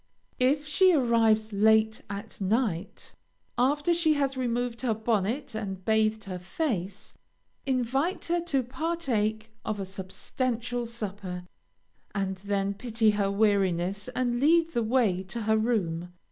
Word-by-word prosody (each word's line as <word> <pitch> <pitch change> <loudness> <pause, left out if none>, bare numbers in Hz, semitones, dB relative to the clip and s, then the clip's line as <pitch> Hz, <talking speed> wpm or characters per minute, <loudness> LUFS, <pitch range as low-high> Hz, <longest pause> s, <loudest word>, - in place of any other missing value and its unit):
If 280 +4 +2
she 365 +5 +4
arrives 225 -5 +3
late 220 +1 +3
at 200 +1 -7
night, 195 -3 -1 0.4
after 290 +7 +2
she 325 -2 +3
has 275 -2 0
removed 245 -1 -2
her 240 -4 +1
bonnet 225 +4 -1
and 195 -4 -5
bathed 220 0 +2
her 185 -3 -6
face, 195 - -3 0.5
invite 270 +7 0
her 345 0 +1
to 275 -6 +1
partake 245 -6 -1
of 215 -2 -3
a 195 - -3
substantial 235 +5 -3
supper, 200 -5 -5 0.7
and 190 -1 -1
then 200 0 -1
pity 225 0 +1
her 205 -1 0
weariness 200 -1 +1
and 245 -1 0
lead 330 +4 +4
the 240 - 0
way 220 -5 +2
to 190 +6 -5
her 220 0 +2
room. 180 -7 -1
220 Hz, 130 wpm, -28 LUFS, 200-255 Hz, 0.7 s, she